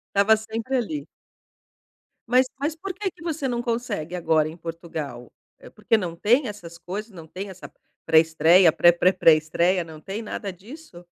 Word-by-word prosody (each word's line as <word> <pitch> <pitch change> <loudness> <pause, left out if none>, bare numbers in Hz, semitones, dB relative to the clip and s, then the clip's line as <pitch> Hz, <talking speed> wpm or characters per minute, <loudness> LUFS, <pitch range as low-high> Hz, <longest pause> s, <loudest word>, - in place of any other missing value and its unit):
Estava 210 +2 +5
sempre 225 +4 -3
ali. 160 - -3 1.2
Mas 255 +1 +4
mas 300 +3 -2
por 375 +3 -6
que 385 0 -3
que - - -22
você 315 -5 -2
não 240 -2 -2
consegue, 230 -8 -3
agora 160 -3 +1
em 160 - -11
Portugal? 160 -8 -7 0.3
É - - -13
porque 215 +1 0
não 175 -5 -4
tem 240 - +2
essas 175 -5 -9
coisas, 200 +6 -7
não 165 -4 -12
tem 190 +5 -7
essa 185 -1 -11 0.3
pré-estreia, 160 +2 +5
pré-pré-pré-estreia, 175 0 +3
não 160 -2 -12
tem 195 +6 -5
nada 205 -2 -5
disso? 200 - -13
185 Hz, 155 wpm, -24 LUFS, 165-230 Hz, 1.2 s, Estava